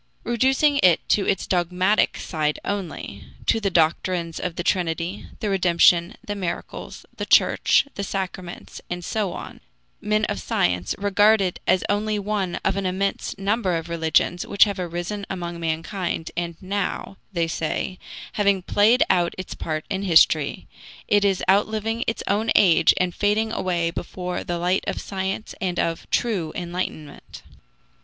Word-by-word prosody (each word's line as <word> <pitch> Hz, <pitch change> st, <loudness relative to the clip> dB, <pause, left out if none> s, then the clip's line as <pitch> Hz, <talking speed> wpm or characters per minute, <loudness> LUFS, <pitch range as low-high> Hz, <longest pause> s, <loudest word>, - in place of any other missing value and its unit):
Reducing 265 Hz, +4 st, +2 dB
it 175 Hz, -3 st, +4 dB
to 200 Hz, -, +2 dB
its 195 Hz, -, 0 dB
dogmatic 180 Hz, +3 st, +1 dB
side 150 Hz, -3 st, -1 dB
only 175 Hz, -, -5 dB, 0.2 s
to 225 Hz, -, +3 dB
the 200 Hz, -2 st, 0 dB
doctrines 170 Hz, 0 st, +1 dB
of 180 Hz, -2 st, -3 dB
the 175 Hz, -, -3 dB
Trinity, 175 Hz, +1 st, -1 dB
the 215 Hz, -, -1 dB
redemption, 175 Hz, -1 st, +4 dB
the 205 Hz, -, -3 dB
miracles, 185 Hz, -4 st, -6 dB
the -, -, -4 dB
Church, -, -, +4 dB
the 200 Hz, -, -4 dB
sacraments, 185 Hz, -2 st, -5 dB
and 175 Hz, 0 st, -4 dB
so 210 Hz, -4 st, -1 dB
on -, -, -8 dB, 0.4 s
men 215 Hz, 0 st, +1 dB
of 205 Hz, -, -3 dB
science 90 Hz, 0 st, 0 dB
regard 205 Hz, +2 st, +4 dB
it 185 Hz, -3 st, -1 dB
as 185 Hz, -, +3 dB
only 210 Hz, +1 st, 0 dB
one 200 Hz, -3 st, -2 dB
of 195 Hz, -, +1 dB
an 195 Hz, -1 st, -1 dB
immense 195 Hz, +2 st, -2 dB
number 195 Hz, -2 st, 0 dB
of 165 Hz, +1 st, -6 dB
religions 170 Hz, +1 st, +1 dB
which 200 Hz, -, +4 dB
have 200 Hz, -2 st, -1 dB
arisen 175 Hz, +4 st, -4 dB
among 175 Hz, -2 st, -5 dB
mankind, 165 Hz, +1 st, -3 dB
and 170 Hz, 0 st, -3 dB
now, 195 Hz, 0 st, -3 dB
they 170 Hz, -3 st, 0 dB
say, 165 Hz, +3 st, -3 dB, 0.3 s
having 200 Hz, -3 st, +2 dB
played 215 Hz, +6 st, +4 dB
out 175 Hz, -2 st, +2 dB
its 185 Hz, -, -6 dB
part 155 Hz, -1 st, -4 dB
in 195 Hz, -1 st, -2 dB
history, 160 Hz, -5 st, +3 dB, 0.4 s
it 205 Hz, -1 st, +3 dB
is 195 Hz, -2 st, +1 dB
outliving 215 Hz, +4 st, +1 dB
its 225 Hz, -, -2 dB
own 215 Hz, +3 st, 0 dB
age 180 Hz, -5 st, +6 dB
and 180 Hz, -1 st, 0 dB
fading 210 Hz, +3 st, +1 dB
away 170 Hz, -5 st, -1 dB
before 180 Hz, +1 st, -5 dB
the 175 Hz, -, -3 dB
light 180 Hz, +2 st, +1 dB
of -, -, -2 dB
science 190 Hz, +2 st, -4 dB
and 180 Hz, -2 st, -1 dB
of 165 Hz, 0 st, -2 dB
true 195 Hz, -10 st, 0 dB
enlightenment. 175 Hz, -4 st, -6 dB
185 Hz, 155 wpm, -23 LUFS, 170-205 Hz, 0.4 s, age